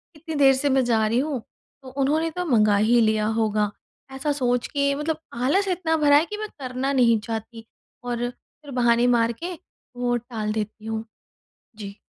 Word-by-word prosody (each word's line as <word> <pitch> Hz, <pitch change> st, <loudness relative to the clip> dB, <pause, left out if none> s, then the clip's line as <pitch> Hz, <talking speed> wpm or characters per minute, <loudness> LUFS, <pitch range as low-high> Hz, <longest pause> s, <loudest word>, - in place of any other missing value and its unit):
"इतनी 320 Hz, +1 st, -7 dB
देर 270 Hz, -, +7 dB
से 285 Hz, +2 st, 0 dB
मैं 265 Hz, -1 st, +3 dB
जा 225 Hz, -2 st, +2 dB
रही 230 Hz, +3 st, +1 dB
हूँ, 280 Hz, -1 st, -1 dB, 0.4 s
तो 260 Hz, -, -11 dB
उन्होंने 305 Hz, +4 st, +1 dB
तो 360 Hz, -, -1 dB
मँगा 210 Hz, -1 st, +4 dB
ही 230 Hz, +4 st, +4 dB
लिया 215 Hz, -1 st, +2 dB, 0.2 s
होगा"। 210 Hz, -1 st, +1 dB, 0.4 s
ऐसा 280 Hz, +3 st, -2 dB
सोच 245 Hz, -3 st, 0 dB
के 280 Hz, -1 st, 0 dB
मतलब 305 Hz, +2 st, -2 dB
आलस 280 Hz, +12 st, +1 dB
इतना 350 Hz, -3 st, 0 dB
भरा 290 Hz, -2 st, +5 dB
है 305 Hz, -, +3 dB
कि 420 Hz, +3 st, -6 dB
मैं 430 Hz, -, -4 dB
करना 255 Hz, +1 st, -2 dB
नहीं 235 Hz, -4 st, +4 dB
चाहती, 225 Hz, +1 st, -6 dB, 0.4 s
और 245 Hz, 0 st, -2 dB
फिर 285 Hz, +3 st, -16 dB
बहाने 240 Hz, -1 st, +3 dB
मार 230 Hz, 0 st, +2 dB
के 360 Hz, -, -3 dB, 0.4 s
वो 245 Hz, 0 st, 0 dB
टाल 225 Hz, -3 st, -4 dB
देती 215 Hz, 0 st, -5 dB
हूँ। 225 Hz, 0 st, -3 dB, 0.7 s
जी। 200 Hz, -2 st, -8 dB
245 Hz, 185 wpm, -24 LUFS, 225-285 Hz, 0.7 s, देर